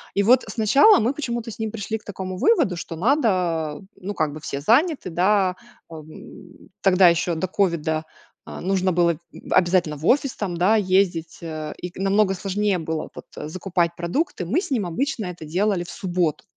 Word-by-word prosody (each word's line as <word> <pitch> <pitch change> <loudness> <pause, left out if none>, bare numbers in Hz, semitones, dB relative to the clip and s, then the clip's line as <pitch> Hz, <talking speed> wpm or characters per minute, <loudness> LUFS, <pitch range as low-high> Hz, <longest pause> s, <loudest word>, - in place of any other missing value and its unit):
И 200 - +3
вот 245 +5 +5
сначала 245 - +5
мы 240 +6 +1
почему-то 235 -5 -4
с 215 - -10
ним 220 -1 -2
пришли 220 0 -4
к 210 - -27
такому 185 -2 -6
выводу, 310 - +3
что 170 -1 -6
надо, 180 - +1
э, 195 - -17
ну, 200 +1 -6
как 155 -4 -1
бы, 155 - -8
все 140 -2 -5
заняты, 265 - +2
да. 185 +1 +2 0.3
А, 165 - -9
м, 155 0 -14
тогда 185 -1 +6
еще 170 0 +1
до 165 +3 -2
ковида, 165 -5 0 0.4
а, - - -8
нужно 185 0 +1
было, 170 0 +3
м, 155 - -9 0.3
обязательно 175 -4 +2
в 150 +3 -6
офис, 275 0 +2
там, 185 -5 -3
да, 190 +6 +3
ездить, 185 -5 +1
э, 155 -2 -5
и 180 - -6
к - - -15
намного 195 +1 +2
сложнее 195 +1 -1
было, 160 -1 -4
вот, - - -10 0.2
закупать 175 -1 -1
продукты. 175 - -2
Мы 265 - +1
с - - -8
ним 230 -8 0
обычно 220 - -2
это 175 -3 -7
делали 185 +3 0
в 175 - -10
субботу. 175 -7 -2
185 Hz, 190 wpm, -23 LUFS, 170-215 Hz, 0.4 s, тогда